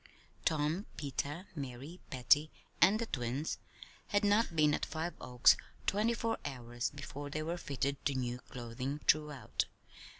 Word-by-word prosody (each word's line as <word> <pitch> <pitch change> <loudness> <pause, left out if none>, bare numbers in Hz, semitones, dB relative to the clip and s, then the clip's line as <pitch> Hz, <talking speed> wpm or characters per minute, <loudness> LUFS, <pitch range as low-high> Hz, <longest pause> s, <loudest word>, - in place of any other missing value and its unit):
Tom, 160 +5 +1
Peter, 145 +4 -3
Mary, 140 +3 -6
Patty, 145 +4 +4 0.3
and 205 +3 +7
the 230 - -1
twins 130 - -2 0.5
had 205 0 +2
not 205 -3 +3
been 150 -2 +5
at - - 0
Five 160 +2 -2
Oaks 125 -1 +6 0.3
twenty 220 +4 +2
four 230 -1 -1
hours 120 -4 -3
before 145 0 -7
they 155 +2 -2
were 165 +2 -1
fitted 140 -4 -2
to 140 - -1
new 125 -1 -1
clothing 125 +4 -5
throughout. 150 -3 +2
145 Hz, 140 wpm, -34 LUFS, 130-170 Hz, 0.5 s, and